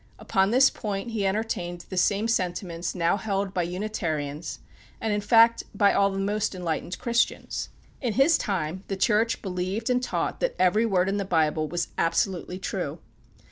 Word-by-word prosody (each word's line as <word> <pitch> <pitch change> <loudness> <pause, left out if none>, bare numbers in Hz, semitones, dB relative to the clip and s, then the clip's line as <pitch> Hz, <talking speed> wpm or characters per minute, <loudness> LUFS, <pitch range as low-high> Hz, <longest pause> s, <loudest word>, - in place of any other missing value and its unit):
Upon 190 0 +1
this 260 +4 +5
point 205 +2 -4
he 205 -3 0
entertained 180 -4 -2
the 190 - -5
same 200 +4 +2
sentiments 180 -5 -2
now 170 +2 +2
held 195 -1 -2
by 180 - +1
the 175 - -5
Unitarians, 160 -6 -3 0.4
and 220 -1 -1
in 205 - 0
fact 230 +2 +5
by 200 0 +4
all 200 0 +3
the 195 - -4
most 200 +1 -1
enlightened 175 0 -3
Christians. 235 -1 -1 0.3
In 240 -5 -1
his 275 +8 +5
time 185 - -2
the 195 - -3
Church 220 +3 +2
believed 190 +5 -2
and 250 0 +2
taught - - -2
that - - 0
every 200 +5 +3
word 185 -3 +2
in 195 +1 0
the 200 - 0
Bible 155 -4 +1
was 175 +1 -2
absolutely 180 +1 0
true. 190 - -3
195 Hz, 175 wpm, -26 LUFS, 175-215 Hz, 0.4 s, this